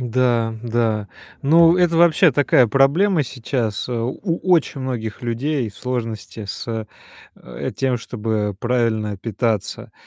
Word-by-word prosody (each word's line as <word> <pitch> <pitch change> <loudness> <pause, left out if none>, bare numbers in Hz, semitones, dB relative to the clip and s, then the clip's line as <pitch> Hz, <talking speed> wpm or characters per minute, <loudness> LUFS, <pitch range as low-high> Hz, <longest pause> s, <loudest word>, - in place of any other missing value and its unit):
Да, 120 -2 +1
да. 115 -3 0 0.4
Ну, 165 +4 +6
это 175 -2 +2
вообще 170 -2 +5
такая 130 -2 +4
проблема 150 - +3
сейчас. 120 -4 -3
Э, - - -3
у 120 +2 -2
у 185 -1 -2
очень 155 -4 +2
многих 120 -5 -4
людей 120 +1 -1
сложности 115 -2 -5
с, 110 +2 -5 0.5
э, - - -6
тем, 130 -2 0
чтобы 105 -4 -3
правильно 110 -4 0
питаться. 110 -1 -2
120 Hz, 125 wpm, -20 LUFS, 110-140 Hz, 0.5 s, Ну